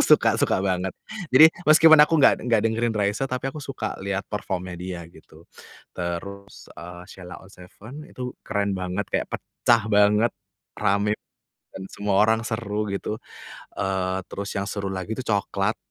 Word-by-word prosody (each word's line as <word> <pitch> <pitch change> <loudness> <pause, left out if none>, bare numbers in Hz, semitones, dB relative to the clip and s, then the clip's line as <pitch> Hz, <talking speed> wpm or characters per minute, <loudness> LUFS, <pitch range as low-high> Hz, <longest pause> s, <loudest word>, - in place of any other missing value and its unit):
Aku - - +5
suka - - +5
suka - - +2
banget. 95 0 0 0.4
Jadi, 155 +4 +10 0.2
meskipun 160 0 +8
aku 165 +2 +2
enggak 140 - +6
enggak 115 -3 +2
dengerin 115 +1 0
Raisa, 105 +5 0
tapi 130 +1 -2
aku 155 - -8
suka 130 -6 -5
lihat 100 0 -2
perform-nya 95 -3 -4
dia 90 -1 -6
gitu. 80 -1 -18 0.5
Terus, 100 +3 -6
eee, 90 +2 -10
Sheila 90 -1 -10
On - - -15
7 110 +10 -12
itu 125 -1 -6
keren 100 -1 -1
banget, 90 +2 -3
kayak - - 0
pecah 115 -1 +1
banget, 105 +2 +4 0.5
ramai 105 0 +1 0.6
dan 95 - -7
semua 100 -1 -1
orang 110 +1 +3
seru 105 -2 -3
gitu, 100 +2 -3 0.6
eee, 95 -1 -1
terus 100 0 -6
yang 100 0 -2
seru 100 -1 -3
lagi 95 +3 -4
itu 130 - -4
Cokelat. 100 0 0
100 Hz, 160 wpm, -24 LUFS, 95-115 Hz, 0.6 s, Jadi